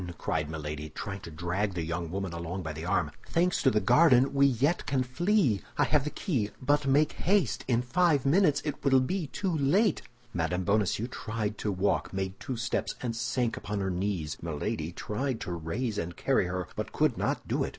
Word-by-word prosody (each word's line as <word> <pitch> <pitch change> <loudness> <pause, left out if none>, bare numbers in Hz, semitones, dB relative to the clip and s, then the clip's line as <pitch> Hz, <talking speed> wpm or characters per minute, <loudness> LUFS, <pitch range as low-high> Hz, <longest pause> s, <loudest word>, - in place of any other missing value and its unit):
cried 75 -1 -1
Milady, 75 -1 -5
trying 95 +5 -6
to 95 - -9
drag 90 +5 -2
the 85 - -1
young 85 0 -3
woman 95 0 -3
along 85 +2 -4
by 80 -1 -4
the 80 +2 -7
arm. 85 -5 +1 0.2
"Thanks 175 +1 +2
to 135 - +5
the 110 - +2
garden, 135 - +5
we 140 0 +5
yet 140 +7 +1
can 135 -2 +1
flee; 150 - +2 0.2
I 145 - +4
have 145 0 +2
the - - -1
key, 140 - -1
but 145 +1 +1
make 145 +3 +4
haste! 185 - +1
in 120 -1 +2
five 155 0 +2
minutes 150 -1 +3
it 150 -2 -4
will 135 -2 +5
be 165 +6 -1
too 185 +4 -2
late!" 170 +8 +3 0.3
Mme. 90 +2 -1
Bonacieux 100 +2 +1
tried 110 -3 -4
to 105 - -1
walk, 95 +2 0
made 95 0 -3
two 130 -5 -4
steps, 125 +2 -1
and 115 -2 -2
sank 120 0 0
upon 105 -1 -3
her 95 -1 -1
knees. 90 -4 -2
Milady 80 0 -3
tried 120 +7 -3
to - - -4
raise 100 +7 -2
and 85 0 -5
carry - - +2
her, 90 -1 -3
but - - -4
could - - +2
not - - -2
do - - 0
it. - - -2
110 Hz, 200 wpm, -29 LUFS, 90-140 Hz, 0.3 s, to